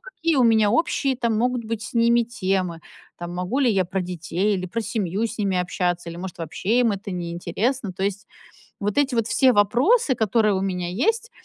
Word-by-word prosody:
какие 335 - -2
у 255 - +4
меня 220 -3 +4
общие 275 -1 +1
там 235 -3 0
могут 245 0 0
быть 225 -1 -3
с - - -7
ними 235 +1 +4
темы, 190 -7 -2 0.4
там, 175 0 -6
могу 180 +10 -2
ли 250 -4 +4
я 190 -3 +2
про 190 +2 -3
детей 180 +3 -1
или 185 0 -4
про 205 +6 -3
семью 205 -3 -2
с 225 0 -8
ними 195 -3 0
общаться, 175 -1 -1
или, 170 - -8
может, 180 -1 -7
вообще 190 +9 0
им 235 -3 +3
это 200 +1 -6
неинтересно. 185 +6 -2
То 190 - -6
есть 200 0 -2 0.5
вот 205 0 -2
эти 275 -3 +1
вот 230 -1 +1
все 260 +2 +4
вопросы, 250 - +3
которые 220 -2 +2
у 190 - -1
меня 180 -2 -2
есть, 445 - 0
210 Hz, 205 wpm, -23 LUFS, 185-240 Hz, 0.5 s, у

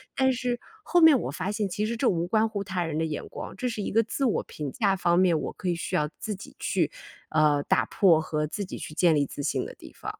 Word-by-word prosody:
但 265 -1 +3
是 245 -1 -2 0.2
后 350 - +3
面 320 -5 +8
我 - - -3
发 185 +6 -3
现 210 -1 -1
其 210 +3 -1
实 230 +2 -2
这 255 - +1
无 170 -2 0
关 220 +3 +3
乎 205 -2 -3
他 185 -3 -2
人 160 -2 -3
的 160 - +1
眼 155 -2 -4
光， - - -7
这 250 +6 -2
是 220 -3 -4
一 - - -3
个 225 - +4
自 270 +5 -2
我 230 - +1
评 145 -3 -6
价 200 - +1
方 175 -2 +2
面， 175 -4 +4
我 - - -4
可 185 - -4
以 175 - +1
需 165 - -3
要 150 0 +1
自 220 - -3
己 195 - -12
去， - - 0 0.4
呃， 150 -2 +3
打 - - +2
破 175 -6 +4
和 150 -1 -1
自 200 +6 -4
己 - - -7
去 - - -7
建 170 +1 +4
立 145 -1 +2
自 145 - -7
信 - - 0
的 - - -8
地 - - -13
方。 - - -7
190 Hz, 295 characters per minute, -27 LUFS, 160-220 Hz, 0.4 s, 面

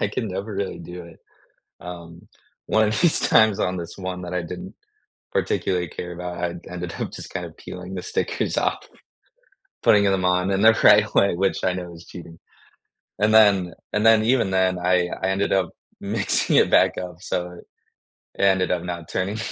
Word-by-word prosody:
I 100 - +1
can 110 +1 -3
never 100 +3 -5
really 100 -1 -3
do 90 0 -9
it. 85 - -15 0.6
Um, 85 -1 -10 0.4
one 110 -1 +3
of 110 - -1
these 170 -2 +4
times 110 -3 +4
on 90 0 -1
this 85 -1 -7
one 95 -1 -5
that 90 0 -6
I 90 - -1
didn't 90 +1 -8 0.6
particularly 90 -2 -1
care 90 +3 -7
about, 90 0 -6
I 85 -1 -1 0.2
ended 90 -1 -6
up - - -3
just - - -8
kind - - -4
of - - -13
peeling 90 +1 -9
the 90 - -5
stickers - - -2
off, - - 0 1.0
putting 105 -1 +5
them 95 -2 +1
on 90 +1 +2
in 95 0 0
the 110 0 +6
right 105 0 +6
way, 100 -2 +3
which 95 +2 0
I 95 - +2
know 90 -1 -6
is 85 0 -13
cheating, 85 -2 -11 0.8
and 105 +1 +3
then 100 -5 +5 0.2
and 105 +1 0
then 110 -1 +5
even 115 -4 +2
then, 95 -1 +1
I 90 0 +2
I 95 - +1
ended 95 +1 0
up 95 -3 +1 0.3
mixing 100 +1 0
it - - +4
back - - +4
up, 90 -2 -6
so 90 -3 -3
it 90 - -17 0.6
ended 95 -2 +3
up 90 -2 0
not 85 -2 -6
turning 95 +4 -2
95 Hz, 190 wpm, -23 LUFS, 90-100 Hz, 1.0 s, the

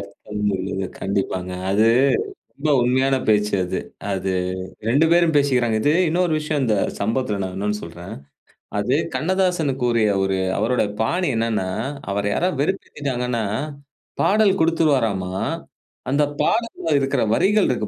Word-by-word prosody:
அர்த்தம் 105 +1 -4
உள்ளது 95 0 -3
கண்டிப்பாங்க. 95 -2 -2 0.2
அது 105 +3 +3 0.7
ரொம்ப 150 +2 -2
உண்மையான 130 +2 +2
பேச்சு 105 -1 +2
அது. 90 - -2 0.3
அது 95 0 -2 0.6
2 140 +7 +4
பேரும் 170 -2 +4
பேசிக்கிறாங்க. 125 -6 +2
இது 145 - +3 0.2
இன்னொரு 175 +1 +1
விஷயம், 150 -2 -1
இந்த 110 -4 +2 0.2
சம்பவத்தில 110 -1 -1
நான் 95 -1 -4
இன்னொன்னு 105 +2 -2
சொல்றேன். 85 +2 -8 0.6
அது - - +1 0.2
கண்ணதாசன் 180 -3 +1
கூறிய 115 -3 +2
ஒரு 95 0 0 0.2
அவருடைய 110 0 +1
பாணி 175 +10 0
என்னென்னா, 115 -4 0 0.4
அவர 100 +1 -1
யாராவது 180 -5 0
வெறுப்பேத்திட்டாங்கன்னா, 125 - -2 0.8
பாடல் 205 -2 +3
குடுத்துடுவாராம்மா. 130 - +1 0.8
அந்த 140 +3 +3 0.2
பாடல்ல 230 -8 0
இருக்கற 135 -1 0
வரிகள் 205 - +3
இருக்கு 120 -4 -1
120 Hz, 125 wpm, -22 LUFS, 100-155 Hz, 0.8 s, 2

